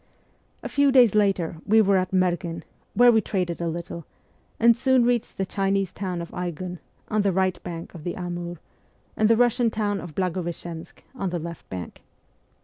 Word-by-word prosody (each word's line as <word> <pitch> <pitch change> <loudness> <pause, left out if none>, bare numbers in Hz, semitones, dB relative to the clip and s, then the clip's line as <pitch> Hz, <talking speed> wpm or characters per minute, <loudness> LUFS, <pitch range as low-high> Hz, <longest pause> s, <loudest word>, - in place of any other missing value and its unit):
A - - -3
few 285 -1 +3
days 250 -5 +6
later 195 -6 +1
we 220 +2 +4
were 200 -2 +4
at 185 -1 0
Merghen, 175 -2 0 0.3
where 245 +3 +7
we 225 -1 +4
traded 180 -4 -2
a 170 - -1
little, 170 -1 -5 0.5
and 235 0 +6
soon 260 0 +3
reached 240 -2 0
the 195 - 0
Chinese 195 -1 0
town 180 -3 -4
of 170 - -10
Aigun, 180 0 -5 0.3
on 215 -1 +2
the 200 -1 +2
right 185 0 0
bank 170 -1 -7
of 165 -4 -10
the 175 - -3
Amur, 175 -1 -5 0.6
and 215 0 +3
the 230 - +6
Kussian 240 0 +3
town 205 -2 -1
of 165 -4 -9
Blagoveschensk, 175 -2 -4
on 195 -8 -3
the 175 - -2
left 170 0 -8
bank. 90 -3 -7
185 Hz, 180 wpm, -25 LUFS, 175-215 Hz, 0.6 s, where